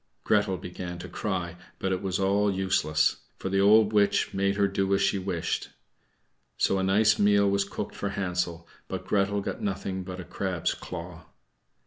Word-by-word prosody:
Gretel 105 -3 +2
began 90 0 -6
to 85 - -8
cry, 90 -4 -3 0.2
but 95 - -2
it 95 - -1
was 95 -1 -1
all 100 +1 +2
useless, 80 -5 +1 0.2
for - - -4
the 95 +1 +2
old 105 +1 +5
witch 105 -1 +2
made 100 0 +1
her 100 -1 +3
do 95 0 -1
as 100 - 0
she 100 - +2
wished. 90 -3 -2 0.9
So 95 - +2
a - - 0
nice 105 +3 +4
meal 100 0 +4
was 100 0 +1
cooked - - -5
for 100 - -3
Hansel, 90 -4 -2 0.2
but - - -5
Gretel 100 0 +1
got - - -5
nothing 95 -1 -3
but 90 0 -7
a - - -5
crab's 95 -3 -2
claw. - - -8
95 Hz, 175 wpm, -27 LUFS, 90-100 Hz, 0.9 s, old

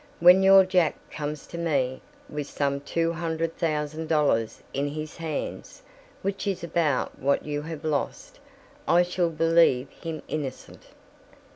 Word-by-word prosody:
When 180 +2 +8
your 195 0 +8
Jack 180 -4 +2 0.2
comes 150 -1 -5
to 170 - -8
me, 135 -6 0 0.3
with 150 -1 -5
some 140 -1 -1
two 165 +3 -1
hundred 165 -1 -2
thousand 155 -1 -2
dollars 145 -8 +1
in 140 +1 0
his 155 +1 -6
hands, 160 -3 -5 0.4
which 195 +1 -2
is 185 -3 -2
about 165 -5 0
what 140 +1 +1
you 145 -1 -2
have 160 0 -7
lost, 150 -2 -3 0.5
I 175 +1 +5
shall 175 -1 0
believe 165 -5 +3
him 165 -3 -7
innocent." 140 -4 -6
160 Hz, 140 wpm, -26 LUFS, 145-170 Hz, 0.5 s, When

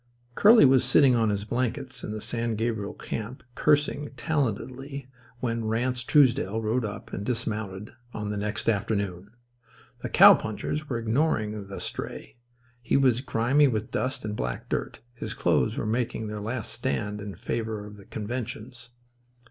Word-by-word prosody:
Curly 220 - +7
was 130 -1 +5
sitting 130 +1 +5
on 115 -2 +2
his 100 0 -1
blankets 125 +2 -2
in - - -4
the 110 0 -5
San 115 0 -1
Gabriel 110 -2 -2
camp 115 +4 -6
cursing 145 +1 +2
talentedly 135 -1 -2 0.3
when 115 -2 -1
Ranse 125 +3 0
Truesdell 120 -6 +3
rode 115 +3 0
up 105 -1 -6
and 100 - -3
dismounted 105 -4 -3 0.2
on 105 -2 -4
the - - -3
next 105 +1 -3
afternoon. 100 -3 -1 0.7
The - - -4
cowpunchers 155 0 +5
were 120 - -1
ignoring 110 -4 0
the 95 - -7
stray. - - -6 0.4
He 120 - +2
was 130 -3 +3
grimy 130 +3 +3
with 110 -1 -2
dust 130 -3 -2
and 105 -1 -3
black - - -4
dirt. - - -3
His 120 - -5
clothes - - +1
were - - -2
making 115 0 -1
their 105 -1 -5
last 115 +2 -3
stand 110 -4 -2
in 100 -2 -6
favour 110 +1 -3
of 105 0 -11
the 100 - -14
conventions. 120 +1 -6
115 Hz, 155 wpm, -27 LUFS, 105-130 Hz, 0.7 s, Curly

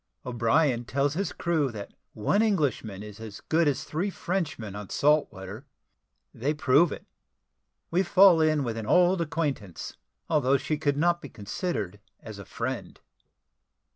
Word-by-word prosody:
O'BRIEN 120 +2 +2
TELLS 140 +3 0
HIS 195 +5 -2
CREW 160 -5 0
THAT 105 -3 -8 0.2
ONE 145 - +2
ENGLISHMAN 145 - 0
IS 105 -1 -10
AS 110 -3 -8
GOOD 160 0 +1
AS 145 - 0
THREE 175 +6 -2
FRENCHMEN 165 - -3
ON 105 -2 -7
SALT 150 +1 +2
WATER 100 +8 -9 0.7
THEY 145 +6 -1
PROVE 145 +3 +4
IT - - -7 0.9
WE 175 +3 +3
FALL 190 -2 +6
IN 155 -2 +2
WITH 115 -3 -3
AN 110 -1 -5
OLD 180 +3 +4
ACQUAINTANCE, 150 - -3 0.3
ALTHOUGH 140 -4 +3
SHE 145 +3 -2
COULD 145 -2 0
NOT 175 +2 +2
BE 145 - -8
CONSIDERED 105 - -4 0.2
AS 110 -2 -10
A 100 - -9
FRIEND. - - -5
145 Hz, 150 wpm, -27 LUFS, 110-165 Hz, 0.9 s, FALL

